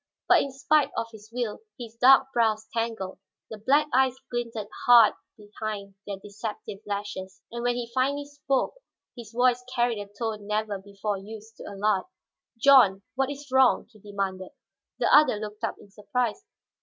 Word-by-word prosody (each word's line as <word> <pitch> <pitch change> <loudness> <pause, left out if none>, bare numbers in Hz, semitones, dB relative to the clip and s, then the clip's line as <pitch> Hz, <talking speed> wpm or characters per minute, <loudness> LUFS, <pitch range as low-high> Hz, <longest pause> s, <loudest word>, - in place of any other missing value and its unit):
But - - +6
in 275 - -3
spite 280 +2 +2
of 230 - -2
his 215 -1 -14
will, 235 -3 -3 0.2
his 230 -3 -9
dark 265 +3 +5
brows 220 -2 +1
tangled, 225 -5 -3 0.3
the 220 - -7
black 280 +8 +3
eyes 260 0 +3 0.2
glinted 230 -3 -3 0.2
hard 235 -3 +8 0.2
behind 210 -1 -6
their 200 -1 -4
deceptive 205 0 -7
lashes. 200 -2 -5
And 235 0 -5
when 245 0 +1
he 240 -1 -5
finally 280 +3 0
spoke, 285 -2 -1 0.4
his 235 -4 -10
voice 250 +1 +2
carried 240 -3 +1
a 205 - -6
tone 210 0 -5
never 210 -1 -1
before 200 +1 -4
used 220 +2 -11
to - - -10
Allard. 200 -1 0 0.5
"John, 230 -7 +6
what 265 +2 0
is 285 -1 -8
wrong?" 260 -3 +4
he 215 - -19
demanded. 195 -2 -4 0.4
The - - +2
other 300 -6 +6
looked 210 +1 -7
up 225 - -1
in 200 - -17
surprise. 220 - -2
225 Hz, 165 wpm, -26 LUFS, 205-250 Hz, 0.5 s, hard